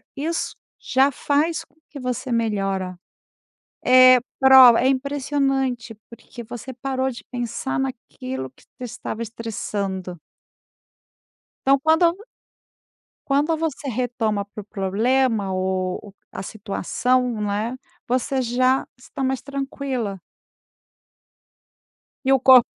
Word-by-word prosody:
isso 320 +4 -2 0.2
já 270 +2 +2
faz 300 +5 0
com - - -31 0.2
que 285 - -8
você 250 0 -3
melhora. 195 -5 -1 0.9
É, 255 0 +9 0.2
prova, 260 -3 +8
é 260 - +3
impressionante 270 -3 -1
porque 235 +1 -11
você 245 +3 -8
parou 260 +1 -2
de 240 - -8
pensar 250 +3 -3
naquilo 130 - -5
que 130 - -24
te 255 - -14
estava 235 -1 -6
estressando. 200 -6 -4 1.5
Então 275 0 +5
quando 325 +4 +3 1.1
Quando 290 +4 +2
você 310 -3 -3
retoma 230 -4 -1
para 210 +1 -9
o - - -16
problema 210 +2 0
o 185 0 -1
o 205 - -12 0.2
a 190 - -4
situação, 230 +4 -1
né, 210 +4 -2 0.3
você 255 +2 0
já 255 +2 +2
está 265 +2 -7
mais 265 0 0
tranquila. 270 -7 -4 2.1
E 270 - +3
o 270 - +5
corp 255 -1 +8
250 Hz, 110 wpm, -22 LUFS, 215-270 Hz, 2.1 s, É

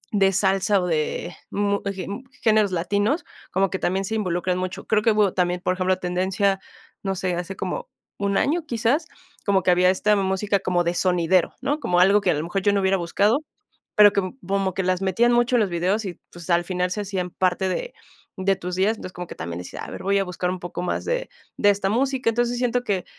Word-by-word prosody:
de 195 -1 +4
salsa 195 +1 +2
o 180 - -2
de 160 +2 -2 0.2
mu 200 0 0
ge 190 -2 -6
m 205 +7 -6 0.2
géneros 215 -3 +4
latinos, 205 - 0 0.3
como 195 +1 +2
que 190 - -2
también 190 +2 0
se 220 - -3
involucran 180 -3 -1
mucho. 185 0 -4
Creo 215 -1 +3
que 225 - +4
hubo 210 -3 +2
también, 180 -1 0
por 185 - +1
ejemplo, 185 0 +1
tendencia, 190 +2 0 0.4
no 195 -1 -1
sé, 185 -1 -1
hace 180 +2 -4
como - - -4 0.3
un 200 -1 0
año 330 +4 +1
quizás, 250 +7 +1 0.4
como 195 -2 +2
que 180 - +4
había 180 +1 +4
esta 210 +3 +2
música 195 +1 0
como 180 -2 +1
de 170 - 0
sonidero, 180 -1 +2
¿no? 290 +2 -1
Como 180 -10 +1
algo 200 +3 +5
que - - 0
a - - +1
lo 150 - -2
mejor 185 +4 -2
yo 205 0 +3
no 200 - +2
hubiera 190 0 +2
buscado, 200 +8 +2 0.6
pero 210 -1 +7
com 200 +6 -2
como 195 -1 -1
que 190 - -1
las 185 0 0
metían 230 +6 +2
mucho 240 +1 +3
en - - +3
los 200 - +1
videos 185 +6 0
y, 180 -3 -6
pues, 175 0 -11
al 170 0 +3
final 180 0 -1
se 210 - -2
hacían 190 -3 -3
parte 185 +1 0
de - - -3 0.4
de 195 +1 +2
tus 180 -1 -5
días. 205 +4 +1
Entonces, 185 - -8
como 180 0 -6
que - - -9
también 85 +1 -5
decía, 90 - -8
a - - -8
ver, - - -7
voy 200 +1 +2
a 195 - +2
buscar 180 0 -2
un 185 - -4
poco 175 0 -5
más - - -2
de - - -2 0.3
de 205 - +4
esta 195 -1 -1
música. 260 +3 +1
Entonces, 240 +1 0
siento 245 0 0
que 190 -5 -1
195 Hz, 230 wpm, -23 LUFS, 180-210 Hz, 0.6 s, pero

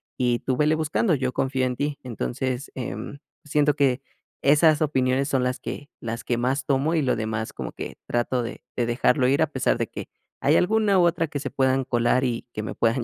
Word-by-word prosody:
y 120 -2 +1
tú 130 -1 -1
vele 150 +1 +3
buscando, 160 +4 +1
yo 130 -2 -1
confío 130 -1 0
en 125 -1 -1
ti". 145 +2 -2
Entonces, 130 +2 -3
em, 115 +2 -5 0.3
siento 150 0 +2
que 135 -2 +2 0.4
esas 150 +2 +5
opiniones 135 -2 +1
son 135 -2 +1
las 125 0 -1
que 145 - -7
las 115 0 -4
que 120 - -1
más 130 +2 0
tomo 140 +4 +1
y 155 - +2
lo 130 - +2
demás 110 0 -3
como - - -6
que - - -7
trato 120 +1 0
de 115 - -7
de 120 - +1
dejarlo 125 +2 +2
ir, 140 +3 +2
a - - +1
pesar 135 -3 +1
de - - 0
que - - -8 0.3
hay - - +4
alguna 210 +1 +3
u - - +5
otra 165 -1 +1
que 145 -1 -4
se - - -5
puedan 130 0 +2
colar, 120 0 +2
y 120 -2 -2
que 105 - -4
me - - -4
puedan 115 +2 +1
130 Hz, 215 wpm, -24 LUFS, 125-145 Hz, 0.4 s, esas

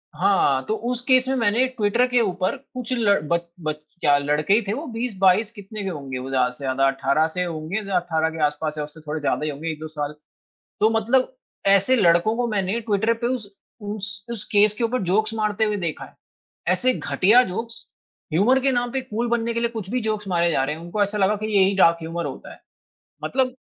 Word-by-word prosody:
हाँ, 180 -9 +2
तो 215 - 0 0.2
उस 250 -1 -3
केस 255 -1 +4
में 265 - 0
मैंने 230 +1 +2
ट्विटर 235 -1 +1
के 245 - +5
ऊपर 185 -1 -1
कुछ 255 -2 -9
ल 215 -5 +3
बच 170 0 +3 0.2
बच 155 -1 -1 0.3
क्या 145 -2 +4
लड़के 150 +5 +1
ही 220 - +4
थे 200 - 0
वो 285 +8 -5
20-22 210 -3 +2
कितने 210 -1 -8
के 195 - -2
होंगे 140 -6 -5
वो 130 +1 -6
ज़्यादा 130 -2 +2
से 125 - -13
ज़्यादा 135 0 +2
18 135 +3 +1
से 180 - +1
होंगे 170 +4 -3
ज़्या 195 -1 -3
18 160 -2 0
के 160 0 -8
आस-पास 150 +1 -2
या 150 - -2
उससे 150 +2 -10
थोड़े 155 +1 -2
ज़्यादा 150 0 -1
ही - - 0
होंगे 150 +4 -5
1-2 155 0 -7
साल। 150 -1 -4 0.7
तो 215 - +4
मतलब 230 - +2 0.4
ऐसे 200 +6 +5
लड़कों 180 0 +3
को 245 0 0
मैंने 205 0 -1
ट्विटर 220 +1 +1
पे - - +3
उस 215 -5 -8 0.3
उस 205 -1 -5
उस 225 -3 -5
केस 210 0 +5
के 220 - -4
ऊपर 235 +1 0
जोक्स 215 +5 +1
मारते 215 -1 0
हुए 210 -1 0
देखा 170 -5 -4
है, - - -19 0.5
ऐसे 255 0 +3
घटिया 225 +4 +4
जोक्स, 230 +4 -6 0.5
ह्यूमर 225 +11 +4
के 270 0 +2
नाम 245 -1 0
पे 265 - 0
कूल 240 -2 -3
बनने 235 0 0
के 235 - -1
लिए 235 - +1
कुछ 220 -5 -7
भी 250 +2 0
जोक्स 215 -2 -2
मारे 170 -2 +2
जा 135 -4 +1
रहे 150 +3 -2
हैं, 165 - -10
उनको 175 +5 -1
ऐसा 205 +1 -1
लगा 200 +1 +3
कि 215 +1 -4
यही 195 +1 +4
डार्क 170 -3 +5
ह्यूमर 165 +1 -4
होता - - -8
है। - - -16 0.6
मतलब 260 -1 0
200 Hz, 225 wpm, -23 LUFS, 165-230 Hz, 0.7 s, के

